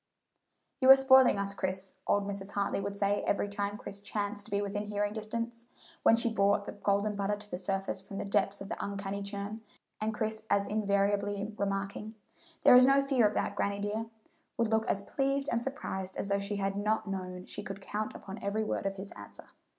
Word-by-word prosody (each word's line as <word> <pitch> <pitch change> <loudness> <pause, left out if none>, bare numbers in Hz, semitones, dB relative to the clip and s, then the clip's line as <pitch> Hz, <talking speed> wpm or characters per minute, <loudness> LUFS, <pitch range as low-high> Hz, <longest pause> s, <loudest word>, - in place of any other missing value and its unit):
"You 260 - +4
are 270 - +13
spoiling 265 -4 +6
us, 200 0 -2
Chris," 190 0 -3
old 205 0 +2
Mrs. 200 0 -4
Hartley 200 0 0
would 200 0 -3
say 200 0 +1
every 205 - +1
time 205 0 -2
Chris 200 -1 -8
chanced 205 0 -3
to - - -14
be 200 - +1
within 205 +1 -3
hearing 205 0 -1
distance, 230 +2 -5 0.3
when 225 - +6
she 230 0 +1
brought 200 -1 +3
the - - -5
golden 205 +1 0
butter 200 +1 0
to 205 0 -9
the 180 - -3
surface 195 0 -2
from 195 +1 -8
the - - -3
depths 200 0 +1
of 195 - -7
the - - -4
uncanny 200 0 -3
churn; 200 +2 -5 0.4
and 215 +1 0
Chris 220 0 -2
as 200 0 +3
invariably 205 0 0
remarking, 200 +2 -3 0.5
"There - - +9
is 250 - +9
no 275 +2 +6
fear 270 -5 +3
of 205 - -4
that, 200 - -1
granny 200 0 0
dear," 210 +2 -2 0.5
would 230 -2 +2
look 220 0 +1
as 200 - 0
pleased 275 +4 0
and 235 - +1
surprised 190 -8 -4
as 200 - -2
though 200 0 +2
she 200 +1 -3
had 195 0 -1
not 210 +2 0
known 185 -2 -5
she - - -6
could 195 -1 -7
count 210 +2 -4
upon 195 +2 -8
every 205 +2 -1
word 215 - -1
of 195 - -3
his 195 +1 -8
answer. - - -12
205 Hz, 210 wpm, -31 LUFS, 200-215 Hz, 0.5 s, are